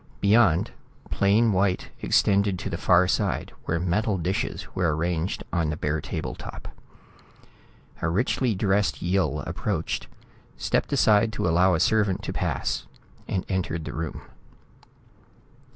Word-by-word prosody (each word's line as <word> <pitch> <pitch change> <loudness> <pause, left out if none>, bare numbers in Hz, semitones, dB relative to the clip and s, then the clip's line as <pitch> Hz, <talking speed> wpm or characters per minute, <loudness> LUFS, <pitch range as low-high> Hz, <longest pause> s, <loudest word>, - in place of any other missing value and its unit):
Beyond, 100 -5 +4 0.4
plain 105 +3 +3
white 95 0 0
extended 100 -1 +2
to 95 +3 -5
the 85 - -2
far 90 +1 +4
side, 100 0 -1
where 85 - 0
metal 100 +4 0
dishes 90 +2 -2
were 85 -4 +1
arranged 85 +2 -2
on 85 -3 +1
the 75 - -3
bare 75 +1 -1
table - - -4
top. - - -9 1.3
A 85 - 0
richly 115 +5 +1
dressed 100 +1 +1
Yill 85 -5 +1
approached, - - -3 0.5
stepped - - 0
aside 110 +1 +4
to 100 - -1
allow 90 +2 +4
a - - 0
servant 105 -2 +2
to - - -4
pass - - -2 0.4
and 95 - -2
entered 90 -4 -2
the - - -5
room. 80 -1 -5
95 Hz, 135 wpm, -25 LUFS, 85-100 Hz, 1.3 s, Beyond